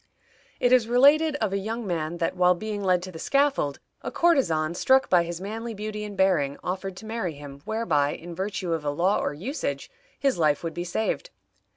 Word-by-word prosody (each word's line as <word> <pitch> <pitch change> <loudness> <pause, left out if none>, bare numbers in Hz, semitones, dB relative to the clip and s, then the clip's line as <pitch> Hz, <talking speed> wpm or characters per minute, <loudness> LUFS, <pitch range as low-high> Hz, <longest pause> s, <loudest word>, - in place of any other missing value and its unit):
It 245 - +2
is 250 -3 +5
related 290 +6 +5
of 215 -8 -1
a 200 - 0
young 225 +3 -4
man 170 -2 -2
that, 170 +2 -1
while 180 0 +4
being 210 +2 -4
led 180 -2 +2
to 185 - -7
the 160 - -9
scaffold, 275 - +1 0.2
a - - -4
courtesan, 170 - +2
struck 265 +8 +3
by 180 -2 +6
his 170 0 -5
manly 225 +4 -5
beauty 210 +1 -5
and 205 -2 -7
bearing, 165 -8 +2
offered 190 +1 -4
to 220 - -10
marry 220 -7 -3
him, 140 -1 -10
whereby, 170 -10 +1
in 170 +1 -9
virtue 190 -1 -3
of 160 -2 -2
a 145 - -1
law 175 +7 +1
or - - -1
usage, 260 - -4 0.3
his 275 -9 +1
life 150 -1 +2
would 165 -1 -3
be 175 - -3
saved. 220 - -2
190 Hz, 205 wpm, -26 LUFS, 170-225 Hz, 0.3 s, by